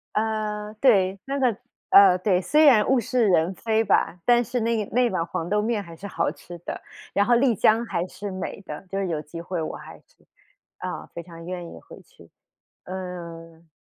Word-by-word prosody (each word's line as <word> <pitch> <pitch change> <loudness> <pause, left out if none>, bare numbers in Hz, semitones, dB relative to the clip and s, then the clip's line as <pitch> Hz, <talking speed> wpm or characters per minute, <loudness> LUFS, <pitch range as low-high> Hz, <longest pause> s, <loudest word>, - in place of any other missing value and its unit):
呃， 215 -1 -2
对， 195 -7 +3
那 275 +1 -2
个 245 -6 +2 0.3
呃， 190 -2 +8
对， 185 -1 +2
虽 300 - +3
然 230 -8 +6
物 265 -2 +4
是 235 0 +1
人 180 -1 +3
非 220 +2 +1
吧， 180 - +1
但 240 0 +5
是 245 +1 -2
那 225 -2 0
那 245 +1 +3
碗 170 -3 -1
黄 170 0 -4
豆 210 0 +2
面 220 -1 -1
还 170 -2 -11
是 185 +5 -11
好 - - -1
吃 175 - -11
的， - - -6 0.3
然 200 - +3
后 240 +2 +4
丽 240 -2 +3
江 220 +5 +3
还 170 -5 -2
是 195 +3 -7
美 185 +1 -5
的， 195 - -8
就 195 - -1
是 195 - -1
有 165 -3 -2
机 165 +2 -9
会 175 0 -4
我 155 - -4
还 - - -11
是， - - -26 0.7
啊， - - -6
非 170 - -6
常 165 -1 -12
愿 175 -1 -5
意 - - -11
回 - - -14
去。 - - -20 0.5
嗯 170 -3 -8
200 Hz, 215 characters per minute, -24 LUFS, 175-225 Hz, 0.7 s, 呃